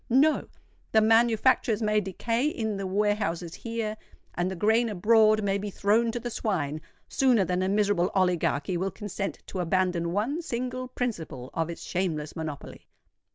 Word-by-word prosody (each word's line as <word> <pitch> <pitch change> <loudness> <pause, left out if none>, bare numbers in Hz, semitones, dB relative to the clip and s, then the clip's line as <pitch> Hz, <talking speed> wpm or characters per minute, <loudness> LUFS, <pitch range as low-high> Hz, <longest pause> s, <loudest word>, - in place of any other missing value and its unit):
No—the 270 -4 +1
manufactures 225 0 +3
may 210 0 +2
decay 230 +7 -1
in 220 -8 -2
the 195 -1 -3
warehouses 185 -4 -1
here, 225 -2 -4 0.4
and 175 +1 -1
the 190 - -4
grain 220 +5 +2
abroad 215 +2 +4
may 200 0 +1
be 205 +1 -4
thrown 215 +4 +2
to 240 - -3
the 240 +1 -5
swine, 155 -10 -2 0.3
sooner 245 -7 +3
than 180 +1 -1
a 185 - 0
miserable 205 -3 +2
oligarchy 180 -2 +1
will 190 +3 -1
consent 200 0 -5
to 190 - -6
abandon 175 -1 0
one 235 - -1
single 255 -3 -4
principle 165 - -4
of 165 0 -1
its 170 - -7
shameless 160 -5 -2
monopoly. 155 -4 -7
205 Hz, 155 wpm, -27 LUFS, 180-230 Hz, 0.4 s, abroad